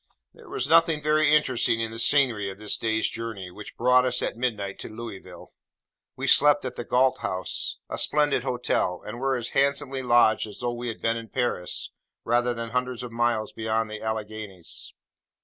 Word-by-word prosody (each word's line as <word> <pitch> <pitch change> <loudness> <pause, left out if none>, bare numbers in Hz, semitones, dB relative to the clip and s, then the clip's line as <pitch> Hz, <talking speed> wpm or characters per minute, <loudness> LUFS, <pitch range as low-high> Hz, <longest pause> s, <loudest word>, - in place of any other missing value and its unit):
There 455 -5 -16
was 415 +2 -2
nothing 165 -2 +4
very 150 0 +3
interesting 130 -6 +3
in 115 -1 -2
the 115 - -6
scenery 115 -5 +3
of 95 - -8
this 105 0 -1
day's 110 -1 0
journey, 110 -5 -5
which 105 +3 -11
brought 125 +1 +4
us 125 -1 0
at - - -2
midnight 105 -5 -3
to - - -6
Louisville. 110 -3 -10 0.6
We 135 - -4
slept 145 +1 +5
at 130 - -4
the - - -5
Galt 130 +2 +2
House; 95 -4 -2
a - - -4
splendid 150 -3 +2
hotel; 125 -8 -1
and 115 +3 -6
were 135 0 +1
as 120 -2 -3
handsomely 140 -1 +1
lodged 120 -3 +4
as 105 - -9
though 120 -1 -2
we 120 +1 -5
had 115 - -6
been 115 0 +1
in 115 -1 -8
Paris, 120 -8 -2 0.3
rather 120 +1 +2
than 115 0 -5
hundreds 125 0 -2
of 125 - -7
miles 115 -2 0
beyond 110 0 -1
the 110 - -6
Alleghanies. 110 -4 -5
120 Hz, 185 wpm, -26 LUFS, 110-130 Hz, 0.6 s, slept